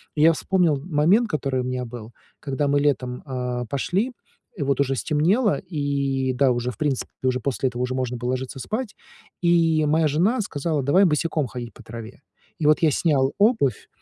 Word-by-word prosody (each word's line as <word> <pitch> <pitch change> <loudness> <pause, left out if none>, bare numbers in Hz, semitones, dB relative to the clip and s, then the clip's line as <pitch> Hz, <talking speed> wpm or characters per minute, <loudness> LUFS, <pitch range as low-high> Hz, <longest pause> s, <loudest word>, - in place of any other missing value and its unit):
И 150 - 0
я 165 +1 +7
вспомнил 170 -2 +1
момент, 180 +8 +3
который 135 -5 -1
у - - -3
меня 125 0 -3
был, 115 -1 -9 0.3
когда 145 +1 -1
мы 145 0 +2
летом, 125 -4 -1
а, 125 -2 -3
пошли, 180 - -1 0.5
и - - -5
вот 140 0 +1
уже 135 -1 +1
стемнело, 180 - +2
и 140 -6 -1
да, 130 +1 +3
уже, 120 0 -1
в 115 - -15
принципе, 145 -4 -1
уже 130 -1 +1
после 130 +1 -1
этого 125 0 -5
уже 125 +1 -2
можно 125 -1 -2
было 120 +1 -2
ложиться 130 +1 -4
спать, 215 - -4 0.5
и 165 -3 +3
моя 155 +1 +3
жена 195 - +2
сказала: 150 -5 -2
"Давай 180 +9 +4
босиком 155 -3 0
ходить 120 0 -7
по - - -15
траве". 115 0 -9 0.4
И 155 - -2
вот 150 +2 +4
я 160 - +4
снял 135 -3 +1
обувь 205 - +2
140 Hz, 190 wpm, -23 LUFS, 125-165 Hz, 0.5 s, я